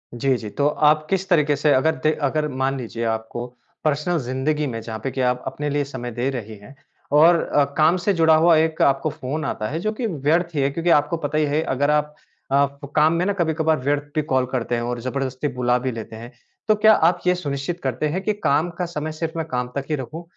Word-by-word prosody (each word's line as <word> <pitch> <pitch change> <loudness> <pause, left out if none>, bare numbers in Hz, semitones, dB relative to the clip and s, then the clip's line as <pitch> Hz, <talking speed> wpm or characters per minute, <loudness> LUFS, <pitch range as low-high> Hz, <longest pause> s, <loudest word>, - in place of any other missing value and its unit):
जी, 130 +2 +1
जी, 110 -3 -7
तो 140 +7 0
आप 155 +1 +3
किस 190 0 0
तरीके 150 -5 +3
से 145 +1 +2
अगर 160 +5 +2
द 155 - +3
अगर 150 +2 +1
मान 135 0 -1
लीजिए 115 -2 -5
आपको 110 +2 -3 0.4
पर्सनल 155 +3 0
ज़िंदगी 140 +4 -1
में, 115 -3 -4
जहाँ 110 -1 -6
पे 135 - -2
कि 130 - -3
आप 125 0 0
अपने 150 0 -3
लिए 145 0 0
समय 125 -3 -6
दे 120 +4 -1
रही 110 -5 -6
हैं 105 +7 -15 0.4
और 170 +2 +6
अ, 145 - +2
काम 160 +4 +4
से 195 +3 0
जुड़ा 160 -2 +4
हुआ 165 +1 +5
एक 160 0 +1
आपको 135 +3 +3
फ़ोन 145 +3 -4
आता 105 - -3
है, 155 +4 -3
जो 215 +5 -1
कि 230 +1 -2
व्यर्थ 165 +1 0
ही 145 - +1
है। 135 - +2
क्योंकि 165 +4 -1
आपको 150 +1 +3
पता 150 -1 -3
ही 155 - +3
है, 145 +2 0
अगर 145 +1 0
आप 150 0 0 0.4
अ, 140 +1 +4 0.3
काम 155 +1 +4
में 170 +2 0
ना 200 - +1
कभी-कभार 160 -3 +1
व्यर्थ 145 +2 0
भी 155 - +2
कॉल 130 -1 +3
करते 120 -2 -1
हैं 120 - -2
और 120 0 -3
ज़बरदस्ती 130 +2 -3
बुला 125 0 +2
भी 130 +1 -2
लेते 115 -1 -7
हैं। 115 +2 -9 0.4
तो 215 - +5
क्या 215 +1 +6
आप 175 -2 +3
यह 180 - +5
सुनिश्चित 145 +1 -4
करते 130 +3 -1
हैं 185 +5 -2
कि 215 - +1
काम 150 +5 +2
का 180 - 0
समय 155 -2 -4
सिर्फ 160 +1 -4
मैं 160 - -2
काम 125 -2 -2
तक 140 -1 -2
ही 155 - +1
रखूँ? 145 +6 -7
145 Hz, 240 wpm, -22 LUFS, 130-160 Hz, 0.4 s, और